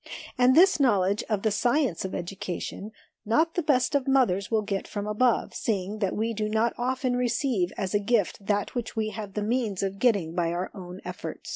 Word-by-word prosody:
And 250 +1 +4
this 370 0 +6
knowledge 205 -6 +2
of 210 -3 0
the 220 - +2
science 240 - +1
of 190 - -4
education, 190 +3 -5 0.3
not 310 +10 +2
the 350 - 0
best 285 -5 +2
of 280 -2 +1
mothers 200 -8 +2
will 220 -2 +1
get 195 -1 -3
from 205 -1 -4
above, 220 +3 +1
seeing 205 -1 -2
that 195 -3 0
we 225 +2 -1
do 215 0 -2
not 220 +2 +1
often 255 0 -1
receive 240 -6 0
as 190 -2 -2
a 205 - +3
gift 205 -2 0
that 205 0 -1
which 240 -3 -4
we 220 -1 0
have 210 -2 -7
the 210 - -1
means 220 -4 -1
of 195 0 -3
getting 200 -10 +2
by 170 -1 0
our 180 +2 -3
own 180 -1 -9
efforts. - - -7
215 Hz, 205 wpm, -27 LUFS, 195-245 Hz, 0.3 s, this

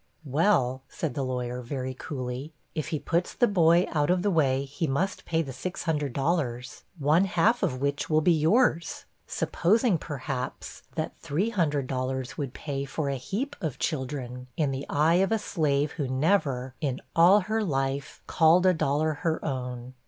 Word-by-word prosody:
'Well,' 135 -3 +2
said 155 -6 -3
the 140 - -2
lawyer, 125 -1 -3
very 130 +1 -4
coolly, 130 +2 -5 0.2
'if 155 -4 -3
he 155 - -1
puts 170 +4 -1
the 245 - +4
boy 175 -3 +4
out 150 -1 +1
of 180 0 +2
the 205 - +2
way, 140 -5 +2
he 145 +4 -3
must 175 +9 -1
pay 165 0 +1
the 135 - -7
$600 145 -5 -2
one 155 +5 +3
half 200 +6 +2
of 130 - 0
which 140 +1 -1
will 155 -1 +4
be 175 - +4
yours'; 165 +1 +2 0.2
supposing, 215 0 +2
perhaps, 135 -3 -5
that - - -4
$300 140 - -1
would 140 -4 -4
pay 140 -2 -3
for 140 +1 -3
a 140 - -1
'heap 220 - -3
of 155 -6 -3
children,' 130 -3 -3
in 150 -4 +1
the 135 +1 -4
eye 155 +4 +3
of 195 - +1
a 225 - +3
slave 150 -8 0
who 145 -5 -3
never, 130 -3 +1
in 135 -4 -1 0.2
all 180 +5 +7
her 220 +3 -1
life, 135 -4 -2
called 170 +2 +4
a 185 - +6
dollar 155 0 +1
her 160 -1 -1
own. 125 -3 -4
150 Hz, 165 wpm, -27 LUFS, 130-170 Hz, 0.2 s, all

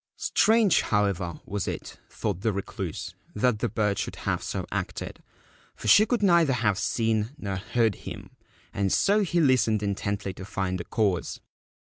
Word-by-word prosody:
Strange, 220 -4 +3
however, 100 -5 0
was 100 -2 -3
it, - - -6
thought 100 -4 -3
the 110 - +1
Recluse, 100 -1 -5 0.2
that 110 0 +2
the - - 0
bird 105 -2 0
should - - -3
have - - 0
so - - -3
acted, - - -4 0.5
for - - -7
she 215 +2 +7
could 240 -4 0
neither 170 -7 +5
have 105 -5 +1
seen 110 -2 0
nor 100 -9 -4
heard 110 +2 +1
him; - - -9 0.4
and 100 -1 0
so 205 +2 +3
he 180 -4 +1
listened 115 -8 +3
intently 100 -1 -2
to 95 - -9
find 95 -1 -2
the 85 - -5
cause. 100 -6 -1
105 Hz, 160 wpm, -26 LUFS, 100-130 Hz, 0.5 s, she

